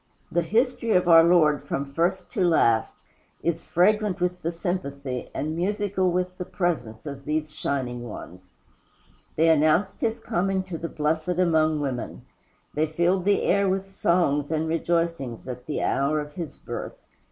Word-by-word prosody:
The 175 - +2
history 230 +5 +1
of 180 -1 +3
our 165 -1 +8
Lord 160 -4 +4
from 140 0 -3
first 180 +4 0
to 200 -6 0
last 115 -10 +2 0.4
is 170 0 0
fragrant 200 +2 +2
with 180 0 -1
the 165 - -1
sympathy 140 -8 -4
and 155 +2 -3
musical 190 +1 0
with 180 +1 -2
the - - -1
presence 155 - -2
of 140 -2 -7
these 155 +1 -2
shining 125 -5 -3
ones. 90 -2 -10 0.9
They 165 +1 +3
announced 160 +5 +3
his 225 +1 0
coming 190 -1 -1
to 180 -4 -6
the 165 - -4
Blessed 160 +3 -1
among 160 -4 +2
Women. 130 -4 -4 0.5
They 155 +2 +1
filled 175 +4 +1
the 200 0 +3
air 200 0 +3
with 195 +1 -2
songs 170 -6 +1
and 160 0 0
rejoicings 165 -7 -1
at 125 0 -7
the 150 - -2
hour 140 +3 +1
of 150 0 -6
his 165 -4 -6
birth. - - -6
165 Hz, 160 wpm, -25 LUFS, 150-185 Hz, 0.9 s, our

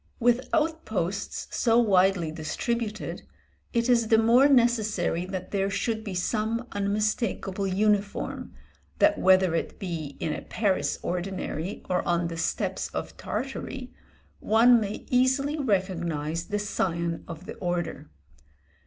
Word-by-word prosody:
With 245 +2 +2
outposts 220 - -1
so 230 -1 +3
widely 190 -6 +3
distributed, 215 +8 -3 0.5
it 235 0 +1
is 235 -3 +3
the 225 - +5
more 235 +5 +6
necessary 215 - +2
that 185 -1 -5
there 195 -1 0
should 220 +2 -1
be 200 -4 -5
some 220 +5 -1
unmistakable 200 -1 -1
uniform, 205 +1 0 0.5
that 310 0 +4
whether 185 -2 +5
it 165 - -2
be 160 -7 -5
in 155 - -1
a - - -5
Paris 200 -4 0
ordinary, 180 0 -3
or 180 - +1
on 170 -1 0
the 165 - -6
steppes 165 - -1
of - - -4
Tartary, 265 -1 -5 0.5
one 235 +2 +5
may 205 0 -4
easily 265 +4 +2
recognise 170 - -1
the 205 - -2
scion 170 -5 -2
of 170 +1 -8
the - - -6
order. 175 -5 -3
200 Hz, 125 wpm, -27 LUFS, 175-235 Hz, 0.5 s, more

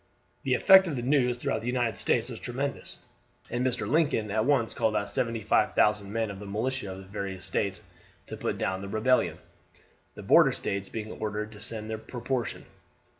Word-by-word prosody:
The - - +1
effect 190 -1 +7
of 155 - -2
the 120 - -3
news 125 -2 +2
throughout - - -2
the 115 - -6
United 120 -3 0
States 115 +3 +1
was 120 -3 -7
tremendous, 135 +3 -5 0.5
and 120 +1 -1
Mr. 130 -2 -1
Lincoln 140 -9 +1
at 110 +1 +1
once 135 -5 +2
called 110 -2 0
out 100 - -1
75,000 105 -3 +1
men 115 -1 -1
of 95 - -9
the 105 - -8
militia 110 +1 -2
of 95 - -7
the 95 - -9
various 95 -1 -6
States 100 -2 -2 0.4
to - - -7
put - - -3
down 95 0 -2
the 100 - -6
rebellion 125 +5 +2 0.8
the - - -9
border - - +6
States 100 0 -3
being 110 -1 -5
ordered 105 0 -4
to 105 - -12
send 110 0 -2
their 110 0 -4
proportion. 120 +2 -4
110 Hz, 185 wpm, -28 LUFS, 105-125 Hz, 0.8 s, effect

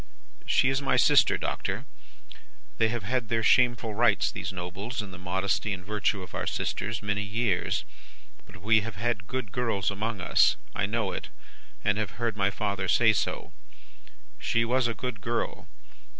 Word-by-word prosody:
"'She 130 - +4
is 135 +1 +1
my 135 - +1
sister, - - +5
Doctor. - - -3 0.9
They 110 - +4
have 120 -2 -3
had 120 +1 -1
their 115 -1 +1
shameful 120 -1 +3
rights, 110 -1 +3
these 90 - -4
Nobles, 95 +7 -5
in 105 -3 -4
the 90 - -10
modesty 95 +3 -1
and 90 -1 -7
virtue 105 -1 0
of 90 - -12
our - - -3
sisters, 110 +1 -2
many 105 0 0
years, 105 -2 0 0.6
but 95 -3 -14
we 110 +1 +5
have 110 -2 -6
had 105 -1 -2
good 130 -6 -4
girls 105 -4 0
among 105 +1 -3
us. 90 - +4 0.2
I - - 0
know - - -1
it, - - -5 0.5
and 105 +1 +2
have 110 -3 -3
heard 115 -2 -1
my 100 -1 +2
father 100 -1 -2
say 110 +3 +5
so. - - -2 0.9
She 115 0 +1
was 125 +1 +2
a 115 - -2
good 125 -2 -5
girl. 115 +2 -2
105 Hz, 170 wpm, -28 LUFS, 100-115 Hz, 0.9 s, sister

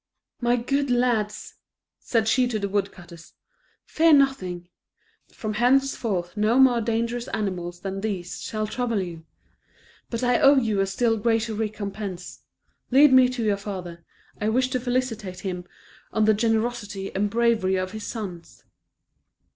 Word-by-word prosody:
"My 240 0 +3
good 275 +3 -1
lads," 240 -4 0 0.4
said 225 -2 0
she 250 +2 +3
to 235 -3 -2
the 200 -1 -2
woodcutters, 180 -4 -5 0.5
"fear 325 0 +4
nothing. 185 -12 +1 0.6
From 215 -2 -5
henceforth 235 -6 +1
no 215 +3 +2
more 255 -3 +5
dangerous 235 +1 -2
animals 180 -5 -4
than 195 0 -4
these 190 -5 -4
shall 215 -1 -3
trouble 230 0 -1
you. 170 -3 -6 0.8
But 230 +1 -3
I 245 -1 +3
owe 280 +1 +6
you 220 -6 +1
a 195 - +2
still 225 +3 +1
greater 225 +1 0
recompense; 205 -3 -5 0.5
lead 275 +2 +6
me 255 -1 +7
to 250 -2 -3
your 205 -2 +1
father; 180 -4 -7 0.4
I 215 - 0
wish 255 +3 +1
to 255 - 0
felicitate 240 -7 -2
him 180 -2 -4 0.5
on 220 -1 +2
the 215 - +5
generosity 220 -2 -1
and 205 +2 0
bravery 225 -4 +2
of 185 0 -2
his 215 0 -7
sons." 185 -7 -7
220 Hz, 145 wpm, -24 LUFS, 195-245 Hz, 0.8 s, me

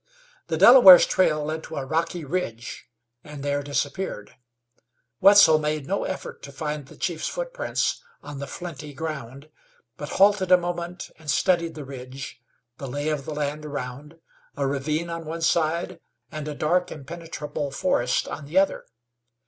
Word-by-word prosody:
The 160 -2 -1
Delaware's 195 -2 +10
trail 155 -5 +1
led 155 +1 -4
to - - -8
a 135 - -3
rocky 165 +3 -2
ridge 135 -8 -4 0.4
and 150 -2 -9
there 145 0 0
disappeared. 140 - -3 0.8
Wetzel 195 -6 +7
made 150 -1 -2
no 195 +5 -1
effort 475 -1 -6
to - - -10
find 150 -3 -5
the - - -15
chief's 170 -3 -2
footprints - - -2 0.2
on 145 -1 -8
the 140 - -5
flinty 150 -5 -8
ground, 140 -2 -6 0.5
but - - -6
halted 195 -1 +4
a 180 - +9
moment 175 0 -5
and 155 -2 -10
studied 170 +2 +1
the 150 -2 -7
ridge, 130 0 -9 0.4
the 135 - -5
lay 145 +4 -2
of 150 -3 -2
the 155 - -5
land 150 +1 -3
around, 145 +2 -7 0.4
a 140 - 0
ravine 150 +5 -2
on 165 0 -5
one 165 +1 -5
side, 165 +1 0 0.3
and 155 -1 -6
a 150 - -4
dark 175 +5 +1
impenetrable 150 -1 -6
forest 125 -4 0
on 150 - -6
the 155 +6 -3
other. 195 +1 +2
155 Hz, 155 wpm, -24 LUFS, 145-175 Hz, 0.8 s, Delaware's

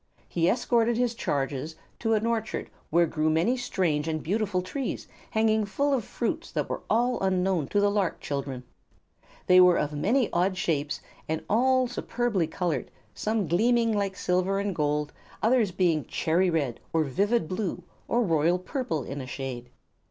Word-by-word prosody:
He 170 0 +1
escorted 235 0 +2
his 245 -1 +1
charges 145 - -2 0.2
to 225 -1 +2
an 215 +1 0
orchard 230 -2 -2 0.2
where 170 +2 +4
grew 155 -1 0
many 165 +11 +2
strange 175 -11 -1
and 155 -1 -2
beautiful 195 0 0
trees 260 +7 -4 0.2
hanging 220 0 +2
full 280 +8 0
of 255 -5 +1
fruits - - -3
that - - -1
were - - -4
all 245 +3 +2
unknown 185 -5 +1
to 205 - +1
the 205 0 +3
lark 200 -4 0
children. 140 -3 -4 0.8
They 180 0 +7
were 180 -1 +6
of 150 0 -1
many 225 - +2
odd 185 +2 +1
shapes 150 -4 -1 0.3
and 160 0 -1
all 255 +3 +3
superbly 240 -6 -1
colored, 165 -5 -2 0.2
some 215 -2 -1
gleaming 230 +6 +3
like 200 -2 -1
silver 185 +2 0
and 200 -1 -1
gold 150 -2 -1 0.2
and 220 - 0
others 230 -6 +3
being 175 -4 +1
cherry 175 +3 +1
red 145 -8 -1
or 160 -1 +2
vivid 200 - +1
blue 185 -1 -3 0.2
or 240 +1 +2
royal 165 -1 +2
purple 185 - -3
in 140 +1 -5
shade. 125 -2 -6
185 Hz, 165 wpm, -27 LUFS, 155-225 Hz, 0.8 s, They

